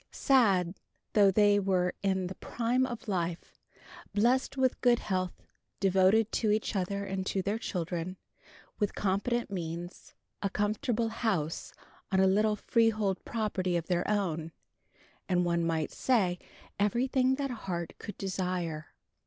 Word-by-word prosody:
Sad, 195 -9 +3 0.3
though 205 -2 +6
they 205 +1 +4
were 185 -2 +1
in 190 -2 +1
the 180 - -4
prime 245 +5 0
of 240 -3 -7
life, 175 -4 -3 0.6
blessed 250 +6 +2
with 260 -1 +1
good 245 -1 +5
health, 185 -5 -3 0.4
devoted 195 +3 +4
to 220 - +1
each 215 +1 0
other 200 +1 -1
and 190 -1 -3
to 190 - -1
their 205 +3 -1
children, 175 -2 -3 0.6
with 205 -2 0
competent 205 +4 0
means, 175 -1 -6 0.3
a 200 - 0
comfortable 220 +3 0
house 200 -9 -2 0.4
on 190 - +3
a 190 - +5
little 210 +3 +3
freehold 215 -3 +1
property 190 -5 -1
of 165 - -3
their 175 +1 0
own, 165 -6 -1 0.8
and, 180 -1 +2
one 170 -1 +1
might 160 -2 -1
say, 190 -9 +1 0.4
everything 255 +5 +2
that 275 -1 -2
heart 175 -7 -4
could 210 - -8
desire. 180 -5 -3
195 Hz, 135 wpm, -30 LUFS, 180-220 Hz, 0.8 s, though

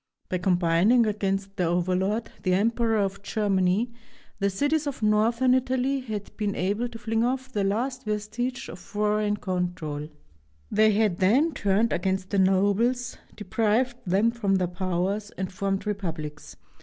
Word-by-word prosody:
By 185 - -1
combining 180 +6 +3
against 195 -1 -2
their 180 - +1
overlord, 185 +5 0
the 185 -2 +2
Emperor 225 +2 +1
of 200 -1 -1
Germany, 200 +1 +1 0.5
the 200 -1 +2
cities 290 +9 0
of 275 -5 -4
northern 230 +4 +3
Italy 260 +1 +1
had 215 -5 -6
been 205 -2 -1
able 205 +6 -1
to 235 - -9
fling 225 +1 0
off 260 +1 -1
the 205 -5 0
last 250 +6 -1
vestige 225 +5 -3
of - - -9
foreign 210 0 0
control. 175 -6 -3 0.6
They 215 0 +4
had 210 -4 +1
then 265 - +3
turned 205 +2 +1
against 190 +1 -1
the 200 - +2
nobles, 205 +6 +2 0.2
deprived 225 +3 0
them 205 +6 +3
of 195 -2 +3
their 180 -1 0
powers, 185 +3 -2
and 190 0 -4
formed 195 +1 -2
republics. 165 -7 -5
205 Hz, 145 wpm, -26 LUFS, 190-230 Hz, 0.6 s, They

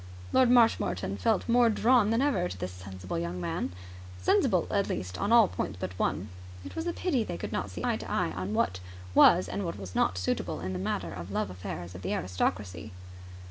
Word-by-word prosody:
Lord 260 -2 +5
Marshmoreton 225 - +3
felt 95 - +1
more 240 0 +5
drawn 225 0 +4
than 230 +4 +2
ever 280 - +1
to 90 - -7
this 90 0 -4
sensible 90 -1 -6
young 85 +1 -3
man 85 +1 -2 0.5
sensible, 90 - +3
at - - +1
least, 90 0 -4
on 205 - 0
all 230 -3 +7
points 100 - -4
but 90 - -4
one. 100 +4 -1 0.4
It - - -8
was 325 +1 -3
a - - +1
pity 300 -12 0
they 85 - -5
could - - -5
not - - -2
see - - -7
eye - - +1
to - - -8
eye - - 0
on 95 +4 -4
what 90 -3 +1 0.3
was 180 - +6
and 200 - -3
what 170 - -4
was 95 -2 -8
not 90 - +1
suitable 90 - -2
in 95 +2 -4
the 90 - -3
matter 90 -2 -2
of 85 -3 -7
the 100 - -7
love 95 - -1
affairs 90 -1 -6
of 90 - -9
the 95 - -2
aristocracy. 90 -1 -2
95 Hz, 220 wpm, -29 LUFS, -, 0.5 s, all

